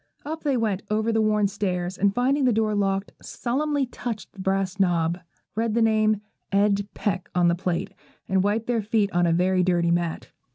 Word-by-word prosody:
Up 315 +2 -4
they 280 -4 +1
went, 210 -4 0
over 220 +2 +1
the 225 0 +2
worn 210 -1 +2
stairs; 185 -3 -2
and, 200 +1 +1
finding 265 +3 +2
the 250 - +4
door 215 -1 +1
locked, 195 -1 0
solemnly 285 +3 -1
touched 240 -3 -6
the 195 - -16
brass 195 0 -1
knob, 175 -2 +1 0.4
read 225 0 0
the 235 - +3
name 215 -1 +2 0.3
'Ed 200 0 +2
Peck' 195 -3 -2
on 175 -1 +4
the - - +3
plate, 175 -1 -2 0.3
and 190 -1 +2
wiped 210 +3 0
their 235 -2 0
feet 210 -1 +1
on 175 0 +2
a - - +3
very 180 +2 +2
dirty 175 -2 +2
mat. 170 -1 -1
205 Hz, 195 wpm, -25 LUFS, 185-225 Hz, 0.4 s, the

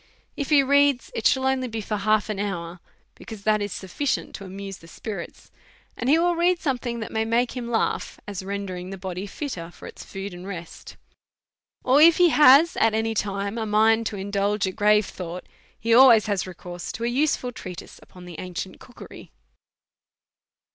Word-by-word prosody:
If 285 - -4
he 290 -2 +5
reads, 280 -1 +3
it 225 - +2
shall 265 0 +1
only 265 -1 +1
be 225 -1 -5
for 215 0 -3
half 215 +1 +1
an 200 - -4
hour, 175 -4 -4 0.4
beciuise 215 -3 -10
that 215 0 +2
is 205 -1 -3
sufficient 195 +11 -3
to 195 - -8
amuse 195 0 -7
the 165 - -16
spirits; 195 0 -8 0.4
and 245 - -2
he 305 - +6
will 345 +1 +2
read 345 +1 +2
something 245 -5 -2
that 220 - -6
will 220 0 +1
make 235 +3 0
him 240 -2 -5
laugh, 225 -2 -1
as 200 -3 -5
rendering 190 -2 -5
the 195 - -7
body 185 +1 -5
fitter 195 - -6
for - - -14
its - - -10
food 195 0 -7
and 175 +2 -9
rest; 170 -4 -9 0.9
or 265 +3 +4
if 330 +1 +7
he 355 -1 +6
has 300 +2 +6
at 225 -1 +3
any 225 0 0
time 200 +1 -2
a 220 - -3
mind 220 +1 +3
to - - -5
indulge 200 +1 -1
a 190 - -2
grave 210 +1 +3
thought, 180 -1 -7 0.3
he 230 +1 +1
always 235 -3 +7
has 200 -3 -1
recourse 175 -1 -7
to 230 - -6
a - - +1
useful 255 0 0
treatise 185 -6 -9
upon 180 -1 -14
the 175 -3 -9
ancient 185 +1 -6
cookery. 245 - -13
215 Hz, 190 wpm, -24 LUFS, 195-250 Hz, 0.9 s, if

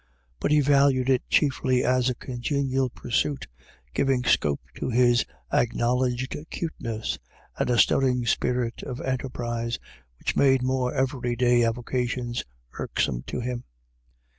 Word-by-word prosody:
But - - 0
he 150 0 +5
valued 135 -2 +4
it 130 - 0
chiefly 130 -3 +2
as 125 0 +2
a 125 - -1
congenial 130 +1 -1
pursuit 125 +4 -1 0.5
giving 135 -2 +1
scope 75 - +2 0.2
to - - -2
his 120 -1 +4 0.3
acknowledged 125 +2 +1
cuteness 115 -9 -4 0.4
and - - -1
a 120 - +3
stirring 125 -1 +3
spirit 125 -1 0
of 125 - -6
enterprise, 120 -3 -2 0.4
which - - -2
made 135 -2 +4
more 130 -1 0
everyday 125 -2 +1
avocations 120 +1 -1 0.3
irksome - - -1
to - - -3
him. 120 0 -3
125 Hz, 120 wpm, -26 LUFS, 120-130 Hz, 0.5 s, he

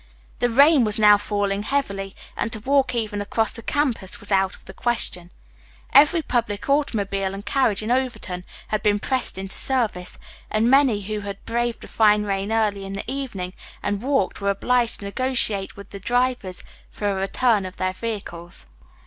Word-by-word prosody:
The 245 - +2
rain 280 +3 +6
was 215 0 +4
now 210 -1 +7
falling 205 -1 -1
heavily, 200 -6 -2 0.2
and 230 - -2
to 220 - -3
walk 265 0 +2
even 215 -3 -2
across 220 +2 0
the 230 - -4
campus 245 -8 -1
was 205 - -5
out 190 -1 +2
of - - -20
the - - -10
question. 220 -7 -1 0.6
Every 305 +4 +6
public 225 -6 -1
automobile 200 -9 0
and 200 +1 -8
carriage 215 -3 +1
in 220 - -2
Overton 245 -8 -1 0.3
had 215 -1 0
been 205 0 +2
pressed 260 -3 0
into 195 0 -5
service, 220 -9 -1 0.3
and 225 +3 +2
many 265 -7 +4
who 210 +2 -4
had 200 -1 -7
braved 235 0 -1
the - - -9
fine 210 -1 +4
rain 200 0 -2
early 210 -3 +1
in 195 0 -6
the 195 - -5
evening 225 -10 -4 0.3
and 205 0 -1
walked 255 -7 0
were 200 - +1
obliged 235 +4 +1
to - - -6
negotiate 215 -4 0
with 200 -1 -11
the 200 - -7
drivers 245 -3 0 0.3
for 205 - -4
a - - 0
return 200 +3 +1
of 185 0 -7
their 185 0 -1
vehicles. 185 -5 -6
210 Hz, 180 wpm, -23 LUFS, 195-245 Hz, 0.6 s, now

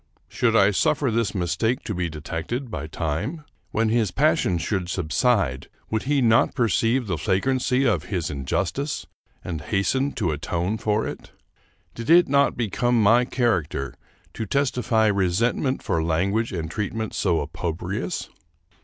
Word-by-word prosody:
Should 115 -2 +1
I 100 -2 +5
suffer 145 - +1
this 110 -3 0
mistake 110 +7 0
to 105 - -3
be 90 -2 -2
detected 85 - -5
by 75 - -4
time? 90 - -3 0.2
When 110 0 +1
his 110 -3 +2
passion 135 - +2
should 90 0 -2
subside, 90 - 0 0.2
would 110 -1 0
he 140 -3 +3
not 115 -1 +4
perceive 120 +1 +2
the 90 -6 -2
flagrancy 125 - +1
of 95 - +1
his 90 -6 -2
injustice 85 - -2 0.4
and 80 -4 -4
hasten 130 - 0
to 90 -8 -1
atone 85 +7 -2
for 105 0 0
it? - - -8 0.6
Did 115 0 -7
it 175 +1 +7
not 140 +1 +2
be 120 -2 0
come 120 +4 +1
my 115 +4 +5
character 85 - -1 0.4
to 110 - -4
testify 125 -4 +1
resentment 105 - +1
for 85 -4 0
language 95 +8 0
and 85 -4 -4
treatment 110 +1 -3
so 85 -4 +1
opprobrious? 90 +5 -3
105 Hz, 145 wpm, -24 LUFS, 85-120 Hz, 0.6 s, it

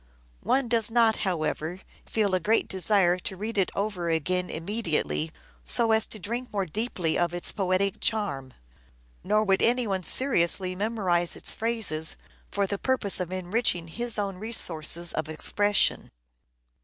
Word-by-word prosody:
One 270 -1 +1
does 230 -2 +2
not, 225 -1 +3
however, 175 -1 -3 0.3
feel 210 -4 0
a 185 - +3
great 215 +6 +1
desire 190 -2 +2
to 190 +1 -6
read 215 +4 -5
it 190 - +1
over 195 -4 -2
again 180 +3 -1
immediately 160 - -2 0.3
so 230 - +3
as 220 0 +3
to - - -5
drink 235 +6 -5
more 200 -2 -1
deeply 180 -3 -2
of 175 0 0
its 175 - 0
poetic 190 0 -1
charm; 140 - -2 0.7
nor 210 +2 +2
would 195 -2 +1
any 245 +1 +2
one 195 -3 -2
seriously 185 - +3
memorize 185 -4 +1
its - - +2
phrases 220 -9 0 0.4
for 200 0 0
the 200 +1 -4
purpose 255 -8 -1
of 180 -1 -4
enriching 185 -2 -1
his 235 +6 -2
own 200 -2 -3
resources 175 -6 +1
of 155 0 -3
expression. 205 +6 +1
195 Hz, 150 wpm, -26 LUFS, 175-220 Hz, 0.7 s, not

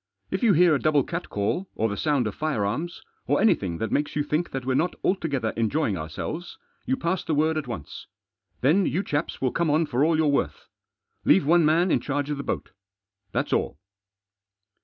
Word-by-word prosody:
If - - -1
you 230 -5 +5
hear 175 0 +5
a 140 - +2
double 150 -2 +3
catcall, 170 - -2
or 110 - +1
the 100 - -3
sound 145 -1 +1
of 105 - -2
firearms, 155 - -2 0.2
or - - +2
anything 95 - +2
that 110 +2 -3
makes 145 0 0
you 150 - +1
think 155 +4 -1
that 135 -2 -5
we're 130 - +1
not 165 +7 +1
altogether 145 - 0
enjoying 115 0 0
ourselves, 85 - -5 0.3
you 265 - +1
pass 185 -5 -1
the 160 - -1
word 155 +2 +2
at 155 -3 -3
once. 105 - -7 0.5
Then 165 +9 +3
you 185 +5 0
chaps 150 -2 -2
will 130 -2 +1
come 170 -1 0
on 155 +3 +3
for 135 -2 0
all 160 +1 +3
you're 160 - +2
worth. 140 -1 0 0.6
Leave 95 - +4
one 170 +2 +5
man 165 +4 +3
in - - +3
charge 145 +1 -2
of 145 - -2
the 140 - -4
boat; - - -4 0.6
that's - - -1
all." - - 0
150 Hz, 200 wpm, -25 LUFS, 125-170 Hz, 0.6 s, you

